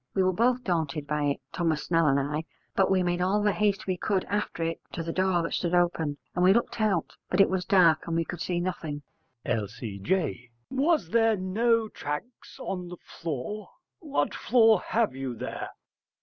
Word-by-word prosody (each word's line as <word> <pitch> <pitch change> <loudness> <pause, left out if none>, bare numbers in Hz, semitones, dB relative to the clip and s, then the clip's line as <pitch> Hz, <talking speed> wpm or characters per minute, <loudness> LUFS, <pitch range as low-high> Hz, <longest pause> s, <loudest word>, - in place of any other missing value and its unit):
We 190 - +3
were 185 0 +2
both 245 +5 +2
daunted 155 -5 -1
by 150 0 -1
it, 140 -1 0
Thomas 165 -4 0
Snell 165 -2 +2
and 140 -1 +4
I, 150 +3 -2 0.3
but 195 - +3
we 190 -1 +3
made 175 0 0
all 200 +3 +2
the 210 - +4
haste 205 -1 0
we 185 -1 -1
could 190 0 0
after 205 -4 -2
it 165 0 -2
to 165 - -3
the 165 0 -4
door 185 -2 +2
that - - -3
stood 175 0 0
open. 165 -4 +1 0.2
And 180 - +1
we 185 +1 +7
looked 235 -1 0
out, 195 -6 +1 0.2
but 180 - 0
it 195 - +6
was 185 -1 -1
dark 170 -5 +4
and 165 - -1
we 165 0 +1
could 175 0 -6
see 175 +2 -1
nothing. 160 -5 -4 0.4
L.C.J. 115 - -2 0.2
Was 280 - +2
there 225 -2 +4
no 225 +5 +1
tracks 150 - -6
of - - -8
it - - -1
on 180 -2 -4
the 180 0 -8
floor? 165 +8 -6 0.3
What 295 -4 -1
floor 225 -4 +4
have 225 - +1
you 135 -2 -4
there? - - -5
180 Hz, 200 wpm, -27 LUFS, 155-205 Hz, 0.4 s, we